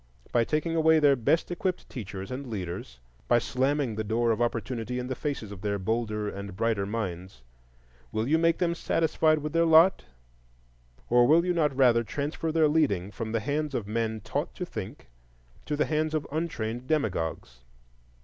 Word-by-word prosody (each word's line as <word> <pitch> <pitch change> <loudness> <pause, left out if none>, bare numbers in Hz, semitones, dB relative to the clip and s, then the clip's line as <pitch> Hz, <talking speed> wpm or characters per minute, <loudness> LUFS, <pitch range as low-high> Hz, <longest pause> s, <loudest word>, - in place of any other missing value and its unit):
By 120 - +3
taking 155 +4 -1
away 160 0 +5
their 145 -3 +5
best 145 +9 +1
equipped 180 +1 -2
teachers 100 -3 -7
and 130 +2 -5
leaders, 90 - -6 0.3
by - - +5
slamming 130 +1 0
the 110 +1 -3
door 115 +2 +1
of 115 - -1
opportunity 120 +1 -2
in 125 - -3
the 130 - -3
faces 130 -6 -4
of 100 -3 -9
their 100 0 -1
bolder 105 +1 -2
and 100 -1 -6
brighter 110 -2 0
minds, 95 - -5 0.7
will 110 +2 -1
you 160 +3 +3
make 165 0 +3
them 170 -2 +1
satisfied 160 -1 +2
with 150 0 -4
their 165 0 +4
lot? 165 +3 +5 1.1
or 120 0 +6
will 165 +3 +5
you 180 - +1
not 150 -5 +1
rather 120 -3 +5
transfer 145 +6 -3
their 160 -1 +4
leading 130 - +1
from 110 +2 -5
the 115 -1 0
hands 145 +3 -2
of 115 - -2
men 110 +1 -2
taught - - -3
to - - -4
think - - -7 0.6
to 150 - -1
the 150 - +1
hands 155 0 0
of 155 - -1
untrained 130 -7 -3
demagogues? 85 - -2
125 Hz, 180 wpm, -28 LUFS, 110-155 Hz, 1.1 s, or